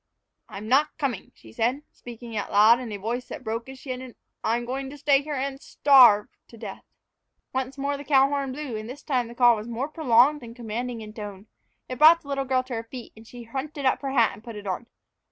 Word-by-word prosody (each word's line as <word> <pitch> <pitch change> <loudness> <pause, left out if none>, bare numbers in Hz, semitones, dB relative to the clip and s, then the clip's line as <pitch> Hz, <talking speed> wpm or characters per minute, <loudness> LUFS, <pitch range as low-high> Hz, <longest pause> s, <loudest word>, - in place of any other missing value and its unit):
"I'm 205 +2 -8
not 280 +5 +2
coming," 270 - -3
she 110 - -16
said, 250 - 0
speaking 235 -1 -10
out 205 - -3
loud 215 +4 +6
in 245 -3 -6
a 205 - -4
voice 235 +5 -4
that - - -8
broke 230 +2 -4
as 265 - -9
she 260 0 -7
ended, 255 -1 -7 0.3
"I'm 235 +2 0
going 265 +2 -4
to 290 - -10
stay 285 -1 +3
here 295 0 -5
and 270 +1 -3
starve 250 -7 +6 0.2
to 230 - -15
death!" 210 -3 -8 0.7
Once 260 +1 -3
more 280 +1 -2
the 285 - -8
cow 270 -2 +4
horn 280 -1 -2
blew, 270 -3 -5
and 215 +1 -7
this 275 +3 -9
time 255 -5 0
the 235 - -11
call 240 -1 +6
was 215 +1 -7
more 240 +5 -3
prolonged 295 -1 +3
and 230 -1 -10
commanding 235 0 -4
in 215 -1 -9
tone. 205 -2 -8 0.4
It 255 -1 -6
brought 330 +2 +8
the 285 - -13
little 275 -1 -1
girl 260 -1 +1
to 255 0 -8
her 225 -1 -3
feet, 250 -3 -9
and 220 +1 -15
she 245 0 -10
hunted 275 +4 -5
up 260 - +2
her 275 - -3
hat 235 -5 +3
and 215 - -14
put 230 -2 -9
it 205 -1 -9
on. 195 +5 -4
250 Hz, 240 wpm, -25 LUFS, 225-275 Hz, 0.7 s, brought